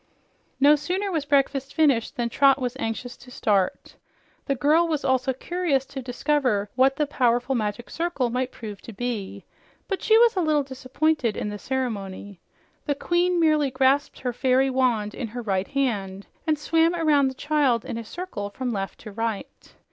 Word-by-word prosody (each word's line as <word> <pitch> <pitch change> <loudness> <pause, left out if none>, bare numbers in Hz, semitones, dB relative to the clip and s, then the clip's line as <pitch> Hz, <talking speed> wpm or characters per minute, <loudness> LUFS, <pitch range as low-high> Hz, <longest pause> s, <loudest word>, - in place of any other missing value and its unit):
No 290 +2 +7
sooner 370 +7 -2
was 315 -5 -1
breakfast 275 -1 +1
finished 275 -8 +2
than 240 -1 -1
Trot 275 +2 +4
was 250 -1 -2
anxious 235 +1 -4
to 250 - -15
start. 200 -6 -1 0.5
The 275 - +1
girl 305 +6 +3
was 310 -3 -2
also 260 0 +2
curious 285 0 -1
to 270 - -7
discover 245 -5 0
what 265 +1 +3
the 300 - +1
powerful 245 -2 +1
Magic 220 0 -2
Circle 330 -8 -2
might 255 +1 -1
prove 210 -4 -8
to 230 - -10
be, 225 -3 -4 0.4
but 390 - -2
she 440 - +5
was 470 -1 +5
a 370 - +1
little 305 -3 +2
disappointed 260 -1 -1
in 210 - -2
the 205 0 -6
ceremony. 205 -7 -4 0.5
The 285 - +1
queen 345 +4 +1
merely 305 -3 +3
grasped 265 +2 +2
her 250 -1 -2
fairy 260 +2 +2
wand 240 -5 +1
in 245 - -4
her 240 +3 -6
right 195 -2 -1
hand 200 -8 -2 0.2
and 310 -1 +2
swam 325 +3 +2
around 300 -5 +3
the 260 - -4
child 280 -5 +1
in 230 - -4
a - - -6
circle, 225 - -6
from 245 +3 -4
left 195 -1 -4
to 215 - -9
right. 225 0 -5
260 Hz, 180 wpm, -24 LUFS, 230-295 Hz, 0.5 s, No